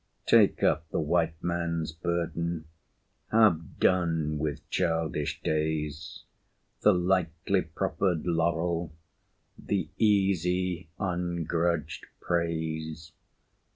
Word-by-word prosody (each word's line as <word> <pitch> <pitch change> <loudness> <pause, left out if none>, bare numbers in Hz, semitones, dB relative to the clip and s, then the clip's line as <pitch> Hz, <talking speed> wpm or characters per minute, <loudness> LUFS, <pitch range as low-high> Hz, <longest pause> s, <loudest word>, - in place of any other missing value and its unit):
Take - - +4
up 80 +2 +2
the - - -1
White 80 +1 +1
Man's 85 -2 -1
burden 85 0 -2 0.7
Have 105 -8 +3
done 80 -4 +2
with 75 -1 -3
childish 80 -4 0
days 75 0 -2 0.6
The - - +6
lightly 90 +1 +1
proffered 85 +1 -1
laurel 85 -1 0 0.7
The 95 -6 -2
easy, 90 -4 +1
ungrudged 85 -3 -1
praise. 80 -2 -2
85 Hz, 85 wpm, -28 LUFS, 80-90 Hz, 0.7 s, The